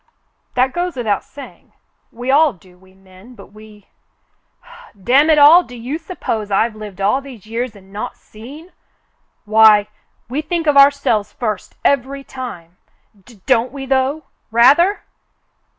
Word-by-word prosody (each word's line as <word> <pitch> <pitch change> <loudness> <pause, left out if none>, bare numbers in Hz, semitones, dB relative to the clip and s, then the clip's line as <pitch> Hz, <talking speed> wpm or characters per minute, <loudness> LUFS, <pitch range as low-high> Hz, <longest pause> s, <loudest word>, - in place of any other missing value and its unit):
That 255 +1 +1
goes 350 -1 -3
without 220 -6 -2
saying. 285 - -14 0.4
We 245 +3 -4
all 295 0 +4
do, 185 -1 -22
we 185 +1 -23
men, 190 +5 -18
but 200 -2 -15
we 215 -1 -16 0.6
— 205 - -20
damn 275 +7 +3
it 310 - +4
all! 300 +5 +8
Do 250 -8 -13
you 250 +7 -5
sup 355 +2 -11
pose 215 -2 -3
I've 215 +3 0
lived 210 -3 -10
all 205 +8 +1
these 255 -8 -13
years 230 +1 -5
and 195 -1 -18
not 205 - -6
seen? 285 +11 -14 0.7
Why 215 -1 +5 0.2
— - - -45
w^e 275 +6 -4
think 330 +1 -3
of 295 -2 +2
ourselves 275 -7 +3
first 215 -5 -5
every 275 0 0
time. 180 -12 -9 0.5
D 230 -6 -19
— - - -46
don't 250 -2 +1
we, 270 0 -7
though? 270 +3 -1 0.3
Rather!" 280 - +4
245 Hz, 160 wpm, -17 LUFS, 210-280 Hz, 0.7 s, all